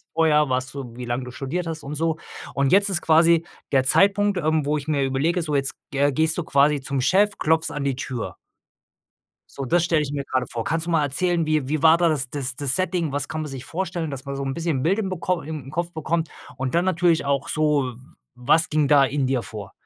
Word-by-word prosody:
vorher 150 Hz, -3 st, +3 dB
warst 130 Hz, +1 st, -2 dB
du, 130 Hz, -4 st, -7 dB
wie 125 Hz, -1 st, -6 dB
lang 120 Hz, +1 st, -2 dB
du 125 Hz, -, -8 dB
studiert 140 Hz, +8 st, -4 dB
hast 165 Hz, -1 st, -5 dB
und 140 Hz, -, -5 dB
so 160 Hz, +1 st, -1 dB, 0.4 s
und 140 Hz, -1 st, +1 dB
jetzt 200 Hz, +3 st, +4 dB
ist 180 Hz, -3 st, +1 dB
quasi 165 Hz, +1 st, +4 dB, 0.3 s
der 135 Hz, -2 st, +3 dB
Zeitpunkt, 200 Hz, +6 st, +3 dB
ähm, 155 Hz, -3 st, 0 dB
wo 150 Hz, +1 st, +1 dB
ich 145 Hz, 0 st, -6 dB
mir 145 Hz, -3 st, +1 dB
überlege, 145 Hz, +7 st, 0 dB
so 155 Hz, -3 st, -3 dB
jetzt 135 Hz, -1 st, +3 dB, 0.2 s
ge 140 Hz, -, -3 dB
äh, 145 Hz, -, -1 dB
gehst 160 Hz, +3 st, +2 dB
du 175 Hz, -, -2 dB
quasi 145 Hz, -1 st, +3 dB
zum 140 Hz, 0 st, -2 dB
Chef, 205 Hz, +9 st, +2 dB
klopfst 160 Hz, +1 st, +1 dB
an 145 Hz, -1 st, -4 dB
die 135 Hz, -2 st, -1 dB
Tür. 130 Hz, -3 st, -5 dB, 1.2 s
So, 140 Hz, -, -5 dB
das 170 Hz, +6 st, +2 dB
stelle 165 Hz, -3 st, +2 dB
ich 145 Hz, -1 st, -4 dB
mir 140 Hz, -1 st, -3 dB
gerade 130 Hz, -2 st, -1 dB
vor. 115 Hz, -1 st, -4 dB
Kannst 165 Hz, +6 st, -2 dB
du -, -, -2 dB
mal 165 Hz, -2 st, +2 dB
erzählen, 165 Hz, +4 st, 0 dB
wie 155 Hz, -3 st, 0 dB
wie 150 Hz, +2 st, -2 dB
war 160 Hz, 0 st, +7 dB
da 170 Hz, -1 st, +3 dB
das 135 Hz, -5 st, -1 dB
das 140 Hz, -2 st, -3 dB
Setting? 170 Hz, +3 st, 0 dB
Was 145 Hz, +1 st, -2 dB
kann 155 Hz, -, -5 dB
man 150 Hz, -, -6 dB
sich 135 Hz, -1 st, -7 dB
vorstellen, 170 Hz, +1 st, -3 dB
dass 140 Hz, -1 st, -7 dB
man 140 Hz, 0 st, -5 dB
so 140 Hz, -, -3 dB
'n 135 Hz, 0 st, -3 dB
bisschen 160 Hz, -5 st, -2 dB
Bild 195 Hz, +7 st, +2 dB
im 200 Hz, -, -2 dB
bekomm 180 Hz, -1 st, -2 dB
in 150 Hz, -4 st, -7 dB
Kopf 170 Hz, +2 st, -2 dB
bekommt 160 Hz, +1 st, -2 dB, 0.3 s
und 130 Hz, +4 st, -2 dB
dann 175 Hz, -, +2 dB
natürlich 170 Hz, -4 st, +2 dB
auch 140 Hz, -1 st, -1 dB
so, 150 Hz, -5 st, +1 dB, 0.4 s
was 145 Hz, +6 st, +2 dB
ging 150 Hz, -1 st, +1 dB
da 140 Hz, -1 st, +5 dB
in 135 Hz, 0 st, -1 dB
dir 130 Hz, -2 st, 0 dB
vor? 105 Hz, -4 st, -8 dB
150 Hz, 240 wpm, -23 LUFS, 135-165 Hz, 1.2 s, war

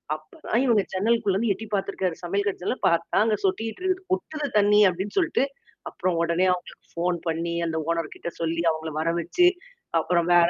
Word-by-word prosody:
அப்பதான் 155 Hz, +9 st, -3 dB
இவங்க 225 Hz, -5 st, +4 dB
சென்னலுக்குள்ளேருந்து 205 Hz, +1 st, +1 dB
எட்டி 220 Hz, +4 st, -8 dB
பார்த்துருக்காரு. 190 Hz, -3 st, -1 dB
சமையல் 200 Hz, +4 st, -1 dB
கட்டு 195 Hz, -, -2 dB
ஜன்னல்ல 245 Hz, -, -1 dB
பார்த்தா, 170 Hz, 0 st, +1 dB
அங்க 220 Hz, -1 st, +2 dB
சொட்டிட்டு 225 Hz, -, -2 dB
இருக்கு. 370 Hz, 0 st, 0 dB
கொட்டுது 305 Hz, -5 st, -3 dB
தண்ணி 210 Hz, 0 st, +5 dB
அப்டின்னு 190 Hz, +3 st, -4 dB
சொல்ட்டு. 330 Hz, -6 st, +2 dB, 0.5 s
அப்புறம் 185 Hz, -2 st, -1 dB
உடனே 170 Hz, +2 st, +2 dB
அவங்களுக்கு 180 Hz, -, -8 dB
ஃபோன் 175 Hz, +1 st, 0 dB
பண்ணி 165 Hz, +1 st, -1 dB
அந்த 160 Hz, -1 st, -2 dB
ஓனர்கிட்ட 170 Hz, 0 st, -2 dB
சொல்லி 165 Hz, 0 st, -1 dB
அவங்கள 160 Hz, 0 st, -2 dB
வர 165 Hz, +1 st, +1 dB
வச்சு, 175 Hz, -, +2 dB, 0.5 s
அப்புறம் 170 Hz, +1 st, +1 dB
வேற 170 Hz, -1 st, +6 dB
185 Hz, 165 wpm, -25 LUFS, 170-215 Hz, 0.5 s, வேற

